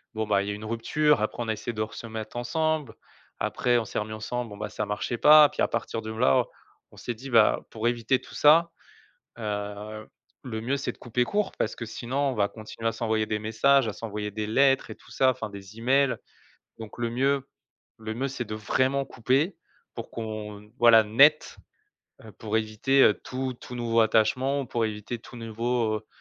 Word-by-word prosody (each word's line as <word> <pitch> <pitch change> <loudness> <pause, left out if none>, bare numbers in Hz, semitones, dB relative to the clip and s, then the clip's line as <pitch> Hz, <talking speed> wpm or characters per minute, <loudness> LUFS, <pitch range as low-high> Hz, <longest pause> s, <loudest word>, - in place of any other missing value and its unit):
bon, 110 0 -1
bah, 100 -2 +2
il 100 - -4
y - - -1
a - - -4
une 105 +1 -9
rupture 115 +5 +1
après 110 +2 -2
on - - -7
a 110 - +1
essayé 110 +2 -5
de 110 -2 -2
re 110 - -8
se 115 - -8
mettre 110 0 -7
ensemble 150 +1 -1 0.4
après 125 -1 +1
on 115 - -1
s'est - - -3
remis 105 +1 -5
ensemble 120 +2 -4
bon 105 - -10
bah, 105 0 -5
ça 105 - -3
marchait 105 +3 -3
pas 150 0 +8
puis - - -5
à - - +4
partir 115 0 -3
de 110 0 -6
là, 90 -12 +3 0.5
on - - -18
s'est 120 - -4
dit: 130 +4 -10
«Bah, 115 -3 +4
pour 110 +1 -2
éviter 120 +2 +1
tout - - -15
ça, 165 +3 +5 0.7
heu, 105 0 -5 0.4
le 110 -4 -5
mieux, 130 +5 -1
c'est 135 - -3
de - - -21
couper 125 0 -1
court 205 +9 -1
parce 110 - -1
que 120 - -6
sinon 120 +4 -5
on - - -3
va 100 -2 +1
continuer 110 +2 -6
à - - -2
s'envoyer 110 -1 -1
des 105 0 -2
messages, 115 +5 +3
à 110 - -3
s'envoyer 105 -1 -5
des 105 +1 -3
lettres 135 +5 +3
et - - -7
tout - - -21
ça, 130 -1 +3
enfin 115 - -6
des 100 +1 -11
emails. 135 +2 +3 0.6
Donc 110 0 -10
le 120 -1 -1
mieux, 135 +3 0 0.5
le 110 0 -5
mieux 135 +4 -2
c'est 130 -2 -4
de 110 - -5
vraiment 130 +5 0
couper 135 - 0 0.4
pour - - -7
qu'on 105 -2 -7
voilà 115 -2 +7
net, 140 +8 +4 0.7
heu, 110 - -12
pour 110 +2 -3
éviter, 110 +5 +2
heu, 105 - +6
tout 130 0 -5
tout 125 - -9
nouveau 115 -1 +1
attachement, 125 +6 +2
ou - - -8
pour 115 -1 -1
éviter 105 +2 -4
tout 120 +2 -13
nouveau, 115 0 -1
heu 105 - -9
115 Hz, 215 wpm, -26 LUFS, 110-130 Hz, 0.7 s, pas